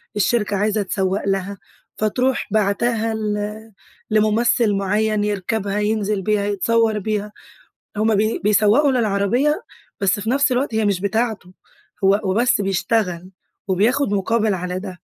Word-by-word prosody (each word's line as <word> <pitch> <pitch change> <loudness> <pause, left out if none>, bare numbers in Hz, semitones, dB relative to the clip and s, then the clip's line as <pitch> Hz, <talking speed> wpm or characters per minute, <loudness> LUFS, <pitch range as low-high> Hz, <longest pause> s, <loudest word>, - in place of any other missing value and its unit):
الشركة 210 0 +1
عايزة 210 +1 +1
تسوّق 190 0 -1
لها، 195 +1 -2 0.4
فتروح 250 +5 0
باعتاها 220 +2 0
ل 215 0 -4 0.4
لممثل 215 +1 +2
مُعين 210 +2 0
يرْكبها، 205 0 -2
ينزل 210 -1 0
بيها، 210 +1 0
يتصور 215 +2 +1
بيها، 210 0 -3 0.7
هم 220 0 +2
بي 215 +2 0
بيسوّقوا 215 +7 +4
للعربية، 245 - +1 0.4
بس 195 +1 +2
في 215 +2 -3
نفس 280 +2 +2
الوقت 250 -2 0
هي 220 -1 +1
مش 200 -3 0
بتاعته، 210 -3 -2 0.5
هو 195 +1 +5
هو 200 -3 -1
بس 235 0 +2
بيشتغل 190 -2 -1 0.4
وبياخد 210 +6 +1
مقابل 215 +2 +1
على 180 0 -3
ده. 185 -3 -8
210 Hz, 130 wpm, -20 LUFS, 200-225 Hz, 0.7 s, هو